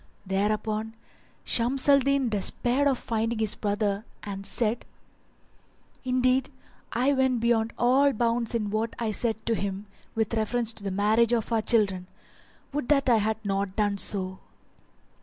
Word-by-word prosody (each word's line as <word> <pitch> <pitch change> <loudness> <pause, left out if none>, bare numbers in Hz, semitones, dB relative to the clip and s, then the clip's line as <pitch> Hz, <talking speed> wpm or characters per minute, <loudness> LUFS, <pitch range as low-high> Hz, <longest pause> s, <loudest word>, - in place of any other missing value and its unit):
Thereupon 215 +3 -1 0.5
Shams 250 +4 0
al 280 -1 +7
Din 275 -1 +1
despaired 240 +6 +1
of 270 -2 +2
finding 225 0 -2
his 220 -1 0
brother 205 0 -1 0.2
and 195 -1 -6
said, 230 +2 -1 1.2
"Indeed 255 0 +1 0.4
I 255 +4 +2
went 260 -2 +2
beyond 230 -1 +1
all 265 +4 +4
bounds 235 0 0
in 210 -3 -1
what 220 +2 -2
I 225 -2 -1
said 220 +1 0
to 230 - +1
him 200 -1 -3 0.3
with 220 0 -1
reference 230 +1 0
to 210 - -6
the 200 - -2
marriage 215 +4 +2
of 230 -1 -1
our 225 -1 +2
children. 200 -5 +1 0.7
Would 290 -3 -3
that 275 -3 +3
I 230 - +5
had 220 +1 0
not 195 -1 -1
done 205 -2 0
so! 190 -2 0
225 Hz, 150 wpm, -27 LUFS, 205-245 Hz, 1.2 s, al